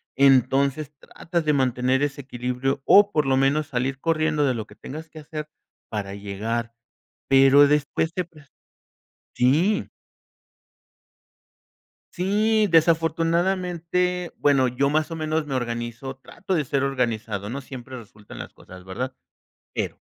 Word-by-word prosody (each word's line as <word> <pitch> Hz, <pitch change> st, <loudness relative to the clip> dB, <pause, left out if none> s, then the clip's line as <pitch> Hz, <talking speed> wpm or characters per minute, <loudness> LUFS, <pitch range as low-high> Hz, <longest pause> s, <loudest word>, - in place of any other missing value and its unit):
Entonces, 140 Hz, +2 st, +3 dB
tratas 170 Hz, -1 st, -4 dB
de 150 Hz, -, +3 dB
mantener 130 Hz, 0 st, +1 dB
ese 145 Hz, -1 st, -2 dB
equilibrio 125 Hz, +1 st, -3 dB
o, 205 Hz, 0 st, +6 dB
por 150 Hz, -5 st, +1 dB
lo 130 Hz, 0 st, +3 dB
menos, 140 Hz, +3 st, +2 dB
salir 135 Hz, -1 st, -2 dB
corriendo 155 Hz, -1 st, +1 dB
de 130 Hz, -2 st, +1 dB
lo 110 Hz, -2 st, -4 dB
que -, -, -17 dB
tengas 155 Hz, +3 st, -9 dB
que 155 Hz, -, -11 dB
hacer 150 Hz, 0 st, -7 dB, 0.4 s
para 100 Hz, -2 st, -4 dB
llegar, 110 Hz, +4 st, -4 dB, 0.6 s
pero 135 Hz, +1 st, +7 dB
después 150 Hz, +3 st, 0 dB
te 180 Hz, -, -2 dB
pres 155 Hz, -4 st, -19 dB, 0.9 s
Sí. 160 Hz, +12 st, +2 dB, 2.3 s
Sí, 210 Hz, +4 st, +2 dB
desafortunadamente. 170 Hz, +2 st, +1 dB
Bueno, 135 Hz, -3 st, +3 dB
yo 130 Hz, +3 st, 0 dB
más 155 Hz, +2 st, +1 dB
o 165 Hz, -, -3 dB
menos 155 Hz, 0 st, -1 dB
me 135 Hz, -, -3 dB
organizo, 120 Hz, +2 st, -4 dB
trato 190 Hz, +7 st, -5 dB
de 150 Hz, -4 st, 0 dB
ser 140 Hz, +1 st, 0 dB
organizado. 115 Hz, -6 st, -2 dB
No 135 Hz, +4 st, -4 dB
siempre 130 Hz, -1 st, -9 dB
resultan 105 Hz, -2 st, -13 dB
las -, -, -7 dB
cosas, 90 Hz, 0 st, -14 dB
¿verdad? 125 Hz, +8 st, -5 dB, 0.6 s
Pero, -, -, -3 dB
140 Hz, 135 wpm, -24 LUFS, 125-160 Hz, 2.3 s, pero